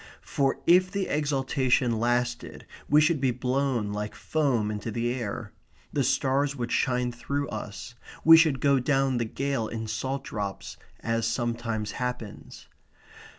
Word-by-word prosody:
For 135 -1 0
if 185 +2 +5
the 195 0 -2
exaltation 135 -5 +1
lasted 120 +1 -1 0.2
we 150 +2 +6
should 155 -2 +2
be 135 - +3
blown 125 -3 -1
like 105 0 -4
foam 130 -9 0
into 105 +2 -4
the 120 +2 -1
air. 120 -5 -5 0.4
The - - +1
stars 140 +2 +1
would 120 -3 -4
shine 125 -1 +1
through 140 +4 -3
us. 105 +1 -7 0.3
We 165 0 +10
should 160 -5 +4
go 140 -1 +4
down 135 -1 +1
the 120 - 0
gale 135 0 -2
in 115 0 -5
salt 130 +5 -3
drops 100 -5 -5 0.2
as 115 0 0
sometimes 115 -2 -2
happens. 125 -4 -6
125 Hz, 145 wpm, -27 LUFS, 115-140 Hz, 0.4 s, We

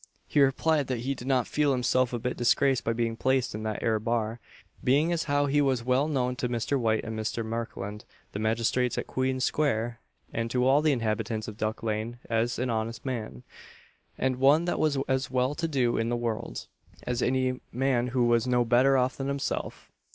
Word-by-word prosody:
He 145 - +2
replied 140 +2 +2
that 125 -3 -2
he 135 +3 -1
did 125 -1 -9
not 130 -3 +2
feel 150 -2 +1
himself 125 0 +1
a 120 - -1
bit 125 +2 -3
disgraced 130 +2 +2
by 115 - 0
being 115 0 -1
placed 130 +1 +1
in 105 - -5
that 110 -1 -3
'ere 110 -1 +2
bar, 115 0 -1 0.4
being 145 +6 +3
as 165 - -1
how 145 -1 +2
he 145 +1 +2
was 130 -4 +1
well 130 +4 +2
known 125 -4 0
to 125 - -1
Mr. 120 +3 0
White 110 -2 +1
and 110 0 -5
Mr. 110 +1 -3
Markland, 110 -2 -5 0.3
the 100 - -5
magistrates 115 +3 +1
at - - -2
Queen 130 0 -1
square, 120 -4 0 0.3
and 115 0 -2
to 125 +1 +1
all 135 +3 +5
the 155 -1 +3
inhabitants 110 -3 -1
of 110 - -6
Duck 110 +1 -3
lane, 110 +2 -2
as 115 +1 +1
an 125 -1 -1
honest 115 +1 -3
man, 110 - -4 0.7
and 130 -1 0
one 140 +6 +4
that 175 - -1
was 150 -3 +2
as 130 -1 0
well 130 +1 +1
to 165 +2 -2
do 130 -6 +1
in 115 +1 0
the 120 - 0
world, 115 -2 -3 0.4
as 125 0 -2
any 130 0 0
man 125 -1 +1
who 125 -1 +1
was 120 0 +2
no 125 -1 +2
better 130 +3 +4
off 130 0 +1
than 135 - -3
himself. 140 0 -3
125 Hz, 205 wpm, -28 LUFS, 115-135 Hz, 0.7 s, all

